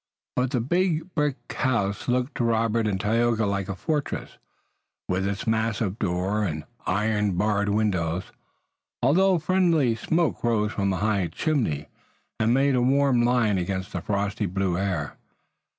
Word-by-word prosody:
But 125 0 +1
the 125 -3 0
big 175 +4 0
brick 150 -3 +1 0.2
house 105 -7 -1
looked 125 +1 0
to - - 0
Robert 115 -1 +1
and 95 -3 -1
Tayoga 115 +1 +1
like 100 -1 -2
a 95 - -2
fortress, 150 - -3 0.7
with 95 +1 0
its 100 0 -3
massive 110 -2 0
door 95 +2 0
and 80 -6 -2 0.2
iron 105 +1 +1
barred 105 +1 +1
windows, 90 -5 0 0.8
although 185 +8 +4
friendly 165 -7 +2
smoke 160 +8 0
rose 110 -3 +1
from 100 -2 0
a 95 - -1
high 100 -3 +1
chimney 80 - -1 0.5
and 110 +1 +2
made 135 +2 +3
a 125 - +2
warm 135 -1 +3
line 120 -5 +2
against 95 +1 -3
the 90 - -3
frosty 100 +2 -1
blue 95 0 -1
air. 90 -6 -2
110 Hz, 150 wpm, -25 LUFS, 100-125 Hz, 0.8 s, although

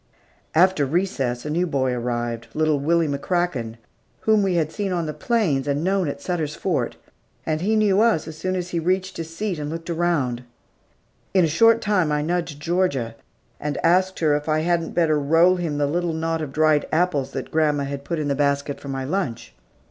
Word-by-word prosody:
After 180 -2 +4
recess, 135 -6 -1
a - - -3
new 175 +3 +1
boy 130 -4 0
arrived, 120 -1 -3
little 155 -2 +2
Willie 165 +3 +2
McCracken, 140 -5 -1 0.5
whom 220 -1 +3
we 190 -2 +1
had 160 -2 0
seen 200 0 -3
on 175 -2 -1
the 155 - -4
plains, 155 - 0
and 145 +2 0
known 190 -1 +1
at 140 0 -4
Sutter's 155 -2 -2
Fort, 150 -12 -1 0.5
and 155 0 -1
he 215 +4 +1
knew 210 -2 +3
us 220 -10 +2
as 160 - -7
soon 185 +4 -2
as 180 -1 -3
he 170 - -1
reached 185 +3 -1
his 165 0 -6
seat 200 -5 -2
and 145 0 -4
looked 165 +2 -5
around. 160 -8 0 0.9
In 185 -3 +5
a - - +2
short 225 +9 +4
time, 195 -8 +1
I 150 0 +1
nudged 165 -2 -2
Georgia, 150 -8 0 0.5
and 150 -1 -3
asked 185 +2 +3
her 150 -2 +3
if 150 +1 -3
I 155 0 +2
hadn't 170 0 0
better 155 -3 +3
roll 165 +5 +4
him 165 -5 -2
the 145 - +2
little 170 +3 -1
knot 165 0 -1
of 150 -3 -4
dried 155 0 +2
apples 155 -5 +1
that - - -5
grandma 150 -2 +2
had 140 0 -5
put 170 +3 -3
in 150 -2 -2
the 140 - +1
basket 140 0 0
for - - -10
my 135 -1 -3
lunch. 130 - -3
160 Hz, 200 wpm, -23 LUFS, 145-180 Hz, 0.9 s, In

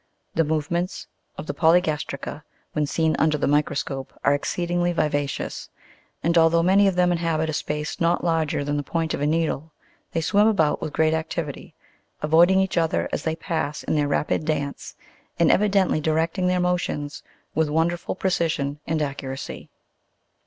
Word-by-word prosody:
The 165 - +2
movements 160 +4 -2 0.3
of - - -6
the 145 - -3
poly 165 +3 +5
gastrica, 150 -3 -4 0.3
when 150 -1 0
seen 160 +1 +1
under 155 -1 +3
the - - 0
microscope, 145 -2 -1
are - - +4
exceedingly 175 +4 0
viva 145 -3 +1
cious; - - -5 0.5
and 170 +1 +2
although 165 +1 +4
many 195 +3 +5
of 190 - +1
them 180 0 +3
inhabit 165 -2 0
a - - -6
space 150 +1 -3
not 170 +1 +2
larger 160 -4 0
than 145 +1 -1
the - - 0
point 165 +2 -2
of - - -3
a 145 - +2
needle, 160 -1 -1 0.4
they 165 - +1
swim 205 +6 +3
about 175 -9 +2
with 155 - -3
great 160 +1 +2
activity, 160 -2 -4 0.5
avoiding 170 +5 +5
each 190 -2 +1
other 165 -1 0
as - - -2
they 160 0 -1
pass 160 -3 -3
in - - -1
their 150 -2 +2
rapid 145 +2 0
dance, 145 -2 -3 0.4
and 170 - +4
evidently 195 -5 +2
directing 165 +4 0
their 180 0 +2
motions 180 -5 -1 0.3
with 160 0 +1
wonderful 165 +4 0
precision 165 -6 -1
and 155 -1 0
accuracy. 135 -2 -6
160 Hz, 165 wpm, -24 LUFS, 150-175 Hz, 0.5 s, poly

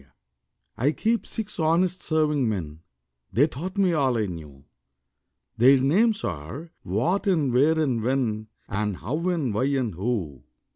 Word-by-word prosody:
_ - - -21 0.7
I 140 +6 +2
keep 225 +5 0
six 215 -3 -4
honest 175 +3 +2
serving 150 -6 +1
men 80 -7 -4 0.5
(They 135 +6 +4
taught 170 +6 -6
me 190 -3 +3
all 135 -6 +2
I 110 - +1
knew); 75 -7 -9 0.9
Their 130 +3 +6
names 205 - +2
are 100 - -5
What 160 - 0
and 155 -10 +2
Why 150 +6 +4
and 130 -7 +1
When 115 -3 -1 0.2
And 105 -1 -2
How 150 - -2
and 155 - -1
Where 135 +6 +1
and 115 -6 -2
Who. 90 - -3
135 Hz, 150 wpm, -25 LUFS, 105-165 Hz, 0.9 s, Their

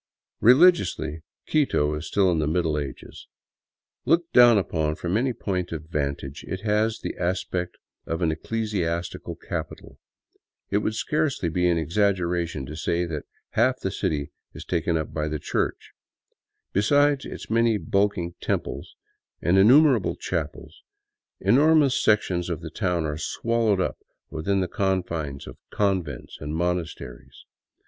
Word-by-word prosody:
Religiously, 115 - +4 0.2
Quito 105 - +1
is 75 - -5
still 95 -3 +2
in 85 - +1
the 75 - 0
Middle 80 -1 +1
Ages. 70 -2 -8 0.8
Looked 170 +1 +1
down 120 -2 +8
upon 80 -5 0
from 85 +3 -2
any 130 +4 +1
point 90 -6 -3
of 80 -2 -5
vantage, 70 -2 -3
it 95 - -4
has 110 +1 +1
the - - -4
aspect 90 0 -2 0.3
of 80 +2 -2
an 80 - +2
ecclesiastical 85 -2 -3
capital. - - -7 0.7
It 100 - +3
would 110 +1 -2
scarcely 150 - 0
be 90 +2 +1
an 85 - +2
exaggeration 85 -3 0
to 75 +4 -8
say 85 +2 -1
that 75 -4 -5 0.3
half 130 +3 +2
the 95 - -2
city 75 -6 -2 0.2
is - - -8
taken 85 -1 0
up 80 - -4
by 75 -1 -1
the 75 0 -2
Church. - - -2 0.8
Besides 145 +7 +3
its - - -8
many 115 -1 +3
bulking 100 -4 0
" - - -40
temples - - -3 0.2
" - - -61
and 85 - +3
innumer 130 +9 +7
able - - -3
chapels, - - -5 0.6
enormous 150 0 +4
sections 90 -5 +2
of 85 -4 -3
the 80 - -7
town 90 -3 -1
are 75 0 -3
swallowed 115 +3 0
up 90 - -1 0.3
within 95 +5 0
the 90 - 0
confines 85 -7 -2
of - - -11
convents 95 -4 -2
and 75 +1 -4
monasteries. 85 -7 -4
90 Hz, 145 wpm, -25 LUFS, 80-110 Hz, 0.8 s, down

